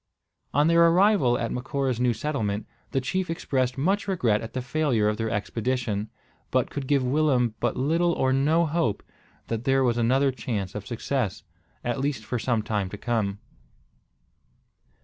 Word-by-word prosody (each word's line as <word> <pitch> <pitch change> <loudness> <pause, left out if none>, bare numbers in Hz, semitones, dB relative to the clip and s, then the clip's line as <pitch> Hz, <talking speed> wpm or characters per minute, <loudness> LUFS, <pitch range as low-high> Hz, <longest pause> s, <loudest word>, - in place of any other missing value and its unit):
On 145 +2 +3
their 170 0 +6
arrival 175 - +4
at 115 -1 -2
Macora's 130 -1 -2
new 125 0 +3
settlement, 110 -4 -2 0.2
the 135 - 0
chief 185 +8 -2
expressed 130 -6 -1
much 195 +9 +1
regret 120 - +1
at 115 - -7
the 130 - -2
failure 125 -5 +1
of 105 0 0
their 115 0 -1
expedition, 110 0 -2 0.4
but - - +1
could 140 -2 -4
give 140 -2 +2
Willem 130 -3 +2
but 120 - -1
little 165 +6 +2
or 130 -3 +1
no 155 +5 +3
hope 150 -9 0 0.4
that 115 0 -3
there 135 0 +3
was 120 -2 +1
other 135 +4 +3
chance 110 -6 -4
of 105 -1 -6
success, 120 -4 -2 0.4
at 120 +2 -1
least 135 -5 -2
for 120 +3 -2
some 115 -2 0
time 105 -4 -1
to 105 - -7
come. 105 -4 -1
125 Hz, 165 wpm, -26 LUFS, 110-145 Hz, 0.4 s, their